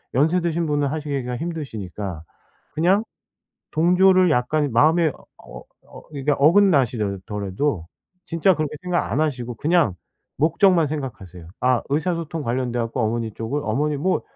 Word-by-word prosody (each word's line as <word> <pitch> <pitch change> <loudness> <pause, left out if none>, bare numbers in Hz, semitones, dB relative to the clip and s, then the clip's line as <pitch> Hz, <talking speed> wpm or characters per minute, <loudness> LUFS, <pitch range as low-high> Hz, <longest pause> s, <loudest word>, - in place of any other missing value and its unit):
연세 160 +7 +3
드신 170 0 -1
분은 145 -1 +1
하시기가 140 -4 -3
힘드시니까 105 - -5 0.5
그냥 185 +7 +3 0.7
동조를 180 +2 +4
약간 145 +2 +1
마음에 160 +5 +4 0.3
어 - - -11 0.3
어 - - -12
이게 140 +1 -2
어긋나시더라도 115 - +1 0.4
진짜 170 +2 +2
그렇게 155 -1 -3
생각 180 - -1
안 140 - +1
하시고 125 -6 -2
그냥 155 - +2 0.4
목적만 165 +2 +3
생각하세요. 95 - -7
아 125 -1 +2
의사소통 165 +1 -1
관련돼 125 0 -2
갖고 115 +2 -2
어머니 115 0 -1
쪽을 130 +6 -3
어머니 145 +7 0
뭐 185 +5 0
145 Hz, 320 characters per minute, -22 LUFS, 120-165 Hz, 0.7 s, 동조를